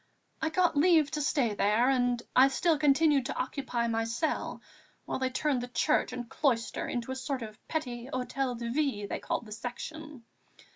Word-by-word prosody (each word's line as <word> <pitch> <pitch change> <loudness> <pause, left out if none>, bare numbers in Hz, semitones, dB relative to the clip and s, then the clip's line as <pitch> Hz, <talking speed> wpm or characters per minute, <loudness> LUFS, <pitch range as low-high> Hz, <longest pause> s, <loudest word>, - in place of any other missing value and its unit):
I 320 - +1
got 345 0 +2
leave 315 -1 +4
to 300 - -2
stay 270 -6 +1
there, 210 +4 +2
and 245 -2 +1
I 260 +1 +8
still 310 +3 +1
continued 290 -2 +4
to - - -4
occupy 255 -2 -2
my 225 0 0
cell, 235 +8 -2 0.4
while - - -3
they 260 0 0
turned 260 0 0
the 245 - -5
church 300 +4 +1
and 245 -1 -5
cloister 235 -4 0
into 240 +1 -3
a - - -3
sort 265 -1 -3
of 215 -1 -11
petty 250 -6 -3
hôtel 255 -1 -2
de 235 0 -4
ville 265 -7 0
they - - -3
called - - -3
the 215 - -12
Section. 260 +5 -7
260 Hz, 185 wpm, -30 LUFS, 235-300 Hz, 0.4 s, I